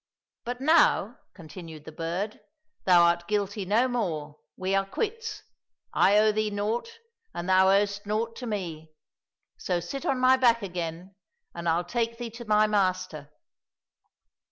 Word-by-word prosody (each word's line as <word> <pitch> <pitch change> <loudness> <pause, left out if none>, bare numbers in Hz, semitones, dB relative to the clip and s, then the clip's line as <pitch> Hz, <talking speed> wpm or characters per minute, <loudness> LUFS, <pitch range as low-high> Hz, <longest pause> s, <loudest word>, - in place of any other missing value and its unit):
" - - -64
But 245 +1 -4
now," 315 +4 +3 0.2
continued 160 -3 -11
the - - -8
bird, 170 +7 -4 0.2
" 310 0 -48
thou 175 -2 +6
art 170 0 +2
guilty 205 -1 -1
no 220 +7 +3
more. 160 - -3 0.2
We 185 +1 -2
are 195 0 +3
quits. 435 - -4 0.5
I 200 +2 +4
owe 215 0 +5
thee 215 0 0
naught, 220 - -3 0.4
and 175 - -4
thou 190 0 +5
owest 200 +1 +1
naught 225 +2 -1
to 250 - -6
me; 170 -7 -5 0.7
so 180 -1 -1
sit 255 +11 -6
on 270 - 0
my 255 +1 +5
back 235 -3 +3
again, 175 0 -5 0.4
and 170 0 -3
I'll 170 +2 +1
take 230 +3 -2
thee 235 -1 -6
to 235 +1 -9
my 215 0 +4
master." 185 -8 -1
205 Hz, 155 wpm, -27 LUFS, 175-230 Hz, 0.7 s, thou